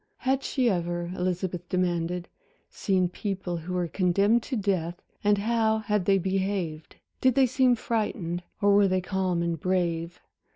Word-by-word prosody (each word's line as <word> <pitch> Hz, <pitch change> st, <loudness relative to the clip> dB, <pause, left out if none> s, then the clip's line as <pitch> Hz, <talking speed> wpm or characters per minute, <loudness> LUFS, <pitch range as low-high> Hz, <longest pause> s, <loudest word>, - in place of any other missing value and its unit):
Had 265 Hz, +1 st, 0 dB
she 260 Hz, -3 st, 0 dB
ever, 175 Hz, -3 st, -1 dB
Elizabeth 180 Hz, -1 st, -2 dB
demanded, 175 Hz, -1 st, -1 dB, 0.4 s
seen 185 Hz, -2 st, +1 dB
people 185 Hz, -1 st, -4 dB
who 175 Hz, +3 st, -5 dB
were 175 Hz, -1 st, 0 dB
condemned 200 Hz, +6 st, +2 dB
to 260 Hz, -, -4 dB
death 185 Hz, -5 st, -1 dB, 0.2 s
and 205 Hz, 0 st, +4 dB
how 220 Hz, +1 st, +1 dB
had 210 Hz, -3 st, -1 dB
they 195 Hz, 0 st, +4 dB
behaved? 190 Hz, -4 st, -2 dB, 0.3 s
Did 260 Hz, -2 st, +4 dB
they 270 Hz, -, +5 dB
seem 255 Hz, 0 st, +3 dB
frightened, 205 Hz, -7 st, -2 dB, 0.2 s
or 205 Hz, 0 st, +5 dB
were 200 Hz, 0 st, +5 dB
they 185 Hz, 0 st, +1 dB
calm 185 Hz, -2 st, -1 dB
and 170 Hz, -2 st, -2 dB
brave? 175 Hz, -1 st, -1 dB
185 Hz, 155 wpm, -27 LUFS, 175-210 Hz, 0.4 s, they